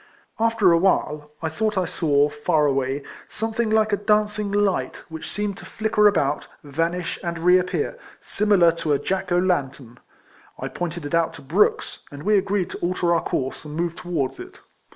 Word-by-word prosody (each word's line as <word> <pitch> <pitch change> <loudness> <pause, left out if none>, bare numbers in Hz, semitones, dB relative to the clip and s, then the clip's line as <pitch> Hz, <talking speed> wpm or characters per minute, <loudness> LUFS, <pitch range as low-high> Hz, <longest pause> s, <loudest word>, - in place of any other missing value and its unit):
After 225 -5 +3
awhile, 160 -4 +1
I 160 - 0
thought 210 +5 -1
I 185 - +2
saw, 145 -4 +2
far 165 -5 +1
away, 135 0 0 0.3
something 225 +1 -2
like 220 -1 +2
a - - +3
dancing 210 0 +1
light, 205 -2 0
which 160 -1 -7
seemed 205 -1 -3
to - - -11
flicker 215 +2 +2
about, 150 -8 +1 0.2
vanish, 165 +4 -2
and 170 -1 -3
reappear, 185 - +2 0.2
simi 210 0 +1
lar 170 -2 +6
to 155 -3 0
a - - +3
Jack 190 +4 -3
o' 175 - +3
lantern. 140 -9 -1 0.6
I - - -5
pointed 170 -2 -4
it 145 - -6
out 165 -1 +1
to 140 - -12
L'rooks, 170 +10 +1
and 145 0 -9
we 210 +3 +3
agreed 195 -1 0
to - - -7
alter 175 0 +1
our 165 - +2
course, 130 0 -3
and 150 -1 -8
move 170 0 -1
towards 145 -8 -3
it. - - -10
175 Hz, 180 wpm, -23 LUFS, 150-205 Hz, 0.6 s, lar